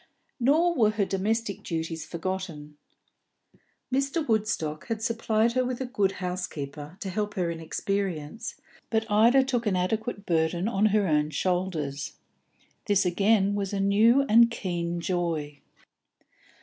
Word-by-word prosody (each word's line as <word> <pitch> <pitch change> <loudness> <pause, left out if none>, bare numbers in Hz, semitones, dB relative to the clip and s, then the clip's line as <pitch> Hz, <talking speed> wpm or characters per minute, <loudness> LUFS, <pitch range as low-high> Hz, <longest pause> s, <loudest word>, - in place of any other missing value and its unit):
Nor 315 +8 +3
were 225 -8 +4
her 215 -2 0
domestic 205 +2 -1
duties 160 -1 -4
forgotten. 170 -4 -5 1.2
Mr. 275 +4 0
Woodstock 210 -9 -1
had 225 -1 -3
supplied 230 0 +1
her 255 +1 +1
with 250 -1 -3
a 260 - -2
good 205 -7 0
housekeeper, 165 -4 -5
to 195 - -3
help 210 +1 -2
her 175 -3 0
inexperience, 180 +4 -3 0.3
but 220 -1 +1
Ida 235 +6 +5
took 245 -4 -1
an 195 - +2
adequate 205 +3 -2
burden 170 +2 +1
on 215 -1 +2
her 210 -1 +2
own 150 -1 +2
shoulders. 160 -5 -2 0.7
This 200 -2 +3
again 200 +2 +3
was 200 -1 -2
a 200 - -1
new 215 +7 +4
and 235 -2 +6
keen 175 -6 -3
joy. 165 -5 -2
195 Hz, 135 wpm, -27 LUFS, 170-225 Hz, 1.2 s, and